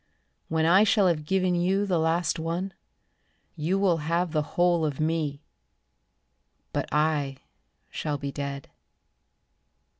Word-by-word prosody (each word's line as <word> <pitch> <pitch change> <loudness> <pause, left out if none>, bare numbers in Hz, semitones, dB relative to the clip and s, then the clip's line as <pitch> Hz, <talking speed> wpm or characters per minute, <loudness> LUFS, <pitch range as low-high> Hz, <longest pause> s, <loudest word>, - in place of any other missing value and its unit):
When 160 -1 +1
I 185 +5 +6
shall 205 -1 +3
have 155 -4 +1
given 185 0 +2
you 185 +3 +1
the 180 -4 +1
last 160 +1 +1
one, 170 +4 -3 0.8
You 170 +4 0
will 190 -4 +3
have 170 +2 -1
the 155 -2 +1 0.2
whole 175 -1 +3
of 150 -2 -2
me, 155 -2 -1 1.3
But - - -2
I 150 -3 +1 0.5
shall 150 -2 -2
be 140 0 -4
dead. 140 -1 -5
165 Hz, 125 wpm, -27 LUFS, 150-180 Hz, 1.3 s, I